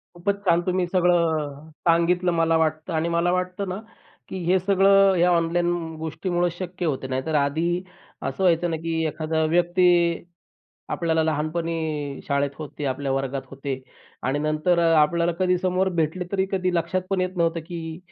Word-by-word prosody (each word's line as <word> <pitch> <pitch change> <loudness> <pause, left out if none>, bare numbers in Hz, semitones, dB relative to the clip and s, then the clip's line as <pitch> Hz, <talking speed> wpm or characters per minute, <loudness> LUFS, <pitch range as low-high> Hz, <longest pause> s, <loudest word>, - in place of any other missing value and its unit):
खूपच 200 +4 0
छान 170 -1 +4
तुम्ही 185 0 +1
सगळं 180 -1 +3 0.5
अ, - - -15 0.2
सांगितलं 175 +2 +3
मला 165 -1 +2
वाटतं 155 +2 -1
आणि 160 +1 0
मला 170 +1 +1
वाटतं 180 +2 -2
ना, 185 - -3 0.5
की 190 - -5
हे 185 +2 +4
सगळं 195 +1 +5
ह्या 175 +1 +4
ऑनलाईन 175 0 +1 0.3
गोष्टीमुळे 175 +3 -1
शक्य 180 0 -5
होते, 135 -3 -2
नाहीतर 130 +4 -2
आधी 165 +6 +1 0.4
असं 190 - -3
व्हायचं 175 -1 +3
ना, 165 - -1
की 165 0 -2
एखादा 160 +1 -1
व्यक्ती, 175 +2 +3 1.0
आपल्याला 160 -1 0
लहानपणी 155 -2 -2
शाळेत 140 0 +1
होते, 150 -1 -7
आपल्या 135 0 -1
वर्गात 135 0 -2
होते 135 -1 -5 0.4
आणि 135 +3 0
नंतर 155 +4 +1
अ, 165 -1 +4
आपल्याला 170 +3 +2
कधी 180 -1 +2
समोर 185 +1 +1
भेटले 160 +4 -1
तरी 190 -1 +1
कधी 185 -2 0
लक्षात 185 +2 0
पण 195 -1 +1
येत 185 0 -2
नव्हतं, 165 -1 +1
की 165 -2 -6
170 Hz, 160 wpm, -24 LUFS, 155-180 Hz, 1.0 s, सगळं